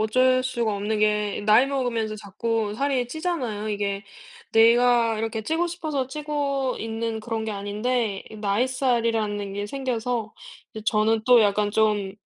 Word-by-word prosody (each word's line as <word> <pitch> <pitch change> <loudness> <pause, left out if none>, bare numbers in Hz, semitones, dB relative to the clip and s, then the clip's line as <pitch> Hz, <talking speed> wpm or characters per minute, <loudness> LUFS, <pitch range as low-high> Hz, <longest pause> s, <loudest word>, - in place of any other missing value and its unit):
어쩔 255 +4 +3
수가 235 -4 -1
없는 210 +2 -2
게 210 -1 +1
나이 220 +5 +6
먹으면서 240 -6 -2
자꾸 215 +1 -2
살이 265 0 0
찌잖아요. 255 - -3
이게 200 -1 -2 0.5
내가 230 0 +5
이렇게 225 0 -3
찌고 325 +8 0
싶어서 310 -6 -3
찌고 280 -2 -2
있는 225 0 -3
그런 225 0 -3
게 220 - -3
아닌데 210 +1 -2
이 220 - -9
나잇살이라는 225 -2 0
게 205 0 -3
생겨서 240 -3 -3 0.4
이제 220 - -6
저는 220 0 +2
또 245 -1 +7
약간 205 0 +2
좀 210 -2 +1
225 Hz, 305 characters per minute, -24 LUFS, 210-255 Hz, 0.5 s, 또